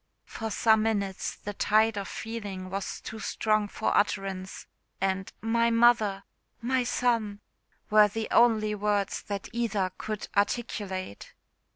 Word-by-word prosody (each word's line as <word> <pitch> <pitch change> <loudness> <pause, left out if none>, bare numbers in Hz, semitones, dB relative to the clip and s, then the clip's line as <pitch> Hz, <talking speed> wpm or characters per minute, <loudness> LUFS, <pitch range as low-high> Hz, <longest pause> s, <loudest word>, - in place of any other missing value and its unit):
For 225 -1 -5
some 220 0 +3
minutes 200 -3 -1
the 205 - -7
tide 215 +2 +3
of 200 -1 -4
feeling 200 -5 -6
was 195 0 -4
too 220 - -7
strong 215 -1 0
for 220 - -1
utterance, 195 -2 -1 0.3
and 190 0 -1
"My 230 +1 +2
mother!" 230 -4 +3 0.4
"My 255 +2 +1
son!" 230 -4 0 0.5
were 210 0 +7
the 220 +2 -4
only 220 -3 +4
words 205 -1 0
that 200 -1 -5
either 215 -6 0
could 215 -1 -4
articulate. 200 - -2
210 Hz, 130 wpm, -28 LUFS, 195-225 Hz, 0.5 s, were